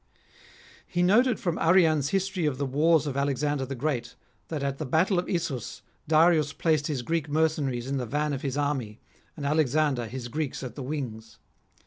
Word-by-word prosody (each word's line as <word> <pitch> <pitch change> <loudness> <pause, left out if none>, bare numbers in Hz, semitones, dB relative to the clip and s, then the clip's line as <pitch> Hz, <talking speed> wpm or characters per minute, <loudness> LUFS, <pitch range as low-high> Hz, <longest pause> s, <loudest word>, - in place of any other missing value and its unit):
He 175 0 0
noted 230 +6 +4
from 175 -2 -2
Arrian's 160 -5 +4
History 190 -3 0
of 135 -3 -1
the 140 - -1
Wars 155 +4 +3
of 140 -3 -3
Alexander 140 0 0
the 135 - -4
Great, 125 -3 -2 0.3
that 155 -4 -4
at 140 -1 -2
the 155 - -3
battle 175 +7 +2
of 175 - -4
Issus, 155 - -3 0.2
Darius 155 -1 +4
placed 155 -2 +1
his 140 -6 -2
Greek 160 +1 -1
mercenaries 145 -5 0
in 135 +1 -2
the 125 -2 -3
van 150 +4 -1
of 135 - -3
his 140 -1 -3
army, 135 -7 -2 0.4
and 145 - -5
Alexander 145 -4 +1
his 125 +1 -6
Greeks 145 +2 -3
at 125 -3 -6
the 140 - -7
wings. 125 -5 -5
145 Hz, 180 wpm, -27 LUFS, 130-160 Hz, 0.4 s, noted